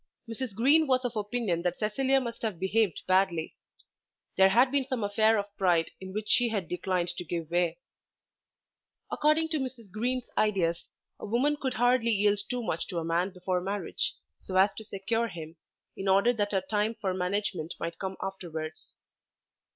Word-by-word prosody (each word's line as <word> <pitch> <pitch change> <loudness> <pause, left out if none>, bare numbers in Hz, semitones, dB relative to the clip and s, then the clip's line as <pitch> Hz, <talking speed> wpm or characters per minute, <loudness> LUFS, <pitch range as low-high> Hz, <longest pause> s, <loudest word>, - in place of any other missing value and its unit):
Mrs. 230 -1 -5
Green 290 +8 +5
was 255 -1 +2
of 240 -1 -2
opinion 210 -4 -1
that 180 0 -1
Cecilia 265 +6 +2
must 235 -3 -5
have 215 -6 -2
behaved 190 0 +1
badly. 185 -3 +1 0.8
There 190 0 +6
had 245 +6 +4
been 275 -2 +1
some 255 -5 -2
affair 215 +2 +3
of 200 0 -4
pride 175 -4 +2
in 190 0 -8
which 210 +2 -4
she 245 -1 +3
had 200 -6 -2
declined 180 0 -1
to 175 0 -4
give 165 -1 -4
way. 175 -1 +1 1.3
According 310 +2 +2
to 315 -2 0
Mrs. 250 -6 -6
Green's 245 +4 -1
ideas 175 -5 +1 0.3
a - - -6
woman 255 +7 +2
could 265 -3 -3
hardly 245 0 +3
yield 205 -1 +3
too 250 -1 -2
much 165 -6 -2
to 180 - -5
a 165 - -1
man 170 +3 +1
before 180 -1 -2
marriage, 195 -1 -2 0.2
so 185 - -7
as 190 +2 +5
to 220 - -8
secure 220 +3 -1
him, 165 -4 -8 0.4
in 195 - -5
order 200 +6 +4
that 205 -3 -1
her 195 -2 +1
time 210 +3 -1
for 195 -3 -1
management 180 -3 -2
might 170 0 -4
come 190 -1 -4
afterwards. 165 -5 -6
205 Hz, 175 wpm, -29 LUFS, 180-235 Hz, 1.3 s, There